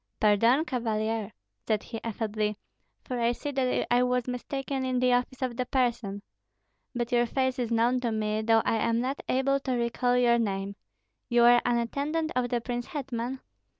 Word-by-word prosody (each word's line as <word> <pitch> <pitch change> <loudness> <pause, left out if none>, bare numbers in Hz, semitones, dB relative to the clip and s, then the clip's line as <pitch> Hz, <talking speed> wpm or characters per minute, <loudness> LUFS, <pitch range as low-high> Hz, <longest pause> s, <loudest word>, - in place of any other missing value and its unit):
"Pardon, 230 +8 +4
Cavalier," 225 - -2 0.4
said 215 -2 +1
he, 225 -2 -7
affably, 215 -2 -2 0.5
"for 250 -2 -4
I 235 0 +2
see 290 +4 -5
that 260 -2 0
I 245 - +4
was 250 -1 +1
mistaken 270 +2 -3
in 255 -1 0
the 250 0 +3
office 250 +1 -1
of 250 -2 -2
the 255 - -1
person. 235 -7 -1 0.7
But 240 0 -2
your 240 -1 +3
face 260 +1 0
is 240 -2 -1
known 235 +2 +2
to 240 -2 -1
me, 215 0 -1
though 225 0 +3
I 225 - +2
am 230 +1 +1
not 260 +4 -2
able 275 +1 +2
to 265 -2 -2
recall 245 +1 +1
your 240 -1 +4
name. 200 -2 -2 0.5
You 240 -1 +4
are 240 0 +7
an 240 -1 +2
attendant 290 +7 -1
of 250 -1 0
the 240 - 0
prince 240 0 -4
hetman?" 260 -2 -4
240 Hz, 185 wpm, -28 LUFS, 225-255 Hz, 0.7 s, are